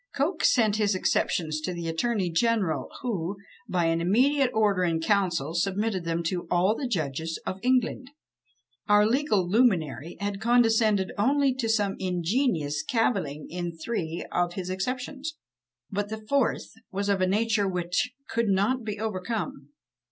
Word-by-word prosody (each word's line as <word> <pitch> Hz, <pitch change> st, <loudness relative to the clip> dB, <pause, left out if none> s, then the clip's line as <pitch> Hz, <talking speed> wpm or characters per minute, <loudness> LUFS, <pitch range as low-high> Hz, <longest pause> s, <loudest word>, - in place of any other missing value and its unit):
Coke 315 Hz, +5 st, 0 dB
sent 215 Hz, -4 st, +4 dB
his 205 Hz, -2 st, +2 dB
Exceptions 155 Hz, -4 st, 0 dB
to 180 Hz, +3 st, -3 dB
the 170 Hz, -1 st, -4 dB
attorney 185 Hz, +2 st, 0 dB
general, 185 Hz, -, +1 dB
who, 195 Hz, -5 st, -2 dB, 0.3 s
by 175 Hz, -2 st, +1 dB
an 165 Hz, 0 st, +1 dB
immediate 260 Hz, +9 st, +3 dB
order 210 Hz, -5 st, +2 dB
in 165 Hz, -2 st, +1 dB
council, 170 Hz, -5 st, +1 dB
submitted 195 Hz, +1 st, -1 dB
them 165 Hz, 0 st, -1 dB
to 175 Hz, 0 st, -2 dB
"all 180 Hz, +4 st, +3 dB
the 265 Hz, -, -3 dB
judges 160 Hz, -, -2 dB
of 190 Hz, -, -4 dB
England." 255 Hz, +1 st, +1 dB, 0.8 s
Our 210 Hz, 0 st, +5 dB
legal 225 Hz, -6 st, +1 dB
luminary 175 Hz, -, +1 dB
had 200 Hz, 0 st, -3 dB
condescended 225 Hz, -4 st, +3 dB
only 275 Hz, +4 st, +3 dB
to 245 Hz, -3 st, -2 dB
some 205 Hz, -3 st, +1 dB
ingenious 180 Hz, -, 0 dB
cavilling 185 Hz, -, -1 dB
in 175 Hz, -1 st, -4 dB
three 165 Hz, -3 st, -3 dB
of 175 Hz, 0 st, 0 dB
his 185 Hz, 0 st, -4 dB
exceptions; 260 Hz, -, -4 dB, 0.5 s
but 205 Hz, +1 st, -2 dB
the 220 Hz, 0 st, -6 dB
fourth 275 Hz, -1 st, +1 dB, 0.2 s
was 200 Hz, +1 st, -2 dB
of 200 Hz, -2 st, +1 dB
a 185 Hz, -, +3 dB
nature 210 Hz, +1 st, +1 dB
which 180 Hz, +6 st, -1 dB, 0.2 s
could 230 Hz, 0 st, 0 dB
not 205 Hz, +6 st, +1 dB
be 210 Hz, -1 st, -4 dB
overcome. 220 Hz, +6 st, -4 dB
200 Hz, 150 wpm, -27 LUFS, 175-230 Hz, 0.8 s, Our